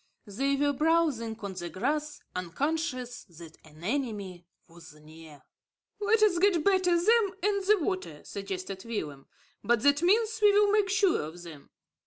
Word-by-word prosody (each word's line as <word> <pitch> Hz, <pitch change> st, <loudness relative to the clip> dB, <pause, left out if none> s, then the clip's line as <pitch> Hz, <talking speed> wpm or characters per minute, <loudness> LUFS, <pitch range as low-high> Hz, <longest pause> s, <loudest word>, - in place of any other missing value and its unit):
They 270 Hz, +7 st, -1 dB
were 285 Hz, +1 st, +1 dB
browsing 295 Hz, -7 st, +1 dB
on 200 Hz, -2 st, -5 dB
the 175 Hz, -2 st, -6 dB
grass, 295 Hz, -, -3 dB
unconscious 255 Hz, -, -3 dB
that 165 Hz, -3 st, -14 dB
an 155 Hz, +1 st, -17 dB
enemy 205 Hz, -7 st, -4 dB, 0.2 s
was 165 Hz, -2 st, -15 dB
near. 155 Hz, -2 st, -15 dB, 0.6 s
"Let 430 Hz, +1 st, +2 dB
us 370 Hz, -5 st, +3 dB
get 360 Hz, -4 st, +3 dB
between 360 Hz, -3 st, +2 dB
them 440 Hz, -4 st, +3 dB
and 400 Hz, -1 st, +1 dB
the 425 Hz, +1 st, +5 dB
water," 370 Hz, -, -4 dB
suggested 195 Hz, -1 st, -6 dB
Willem. 150 Hz, -12 st, -6 dB, 0.4 s
"By 240 Hz, -, +3 dB
that 285 Hz, +6 st, +2 dB
means 440 Hz, +5 st, +2 dB
we 415 Hz, -1 st, +6 dB
will 410 Hz, 0 st, +4 dB
make 415 Hz, -2 st, +2 dB
sure 390 Hz, -2 st, +2 dB
of 160 Hz, +3 st, -8 dB
them." 155 Hz, -5 st, -12 dB
265 Hz, 155 wpm, -28 LUFS, -, 0.6 s, we